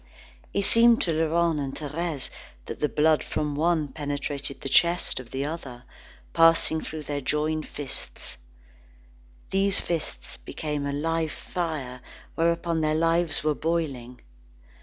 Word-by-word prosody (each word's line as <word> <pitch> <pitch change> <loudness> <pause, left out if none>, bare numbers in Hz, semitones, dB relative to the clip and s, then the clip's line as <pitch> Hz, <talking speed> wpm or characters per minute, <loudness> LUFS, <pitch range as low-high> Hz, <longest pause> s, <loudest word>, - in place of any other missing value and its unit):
It 200 - 0
seemed 230 +2 +6
to 165 - +1
Laurent 165 0 +2
and 135 -1 -3
Thérèse 150 -1 -3 0.3
that - - -6
the 150 - +1
blood 155 0 +3
from 150 -1 -2
one 155 0 +1
penetrated 145 -1 -3
the - - -4
chest 170 +4 +3
of 125 -2 -10
the 135 +2 -2
other, 135 -6 -6 0.5
passing 165 -1 +5
through 155 -1 -6
their 145 -1 -3
joined 155 +3 0
fists. 140 - -5 1.1
These 195 0 +3
fists 170 -3 -4
became 150 -2 -4
a - - -1
live 160 +2 0
fire 150 -8 -4 0.3
whereon 170 0 +1
their 155 0 +2
lives 165 -1 +2
were 155 0 +2
boiling. 140 -7 -2
155 Hz, 135 wpm, -26 LUFS, 145-165 Hz, 1.1 s, seemed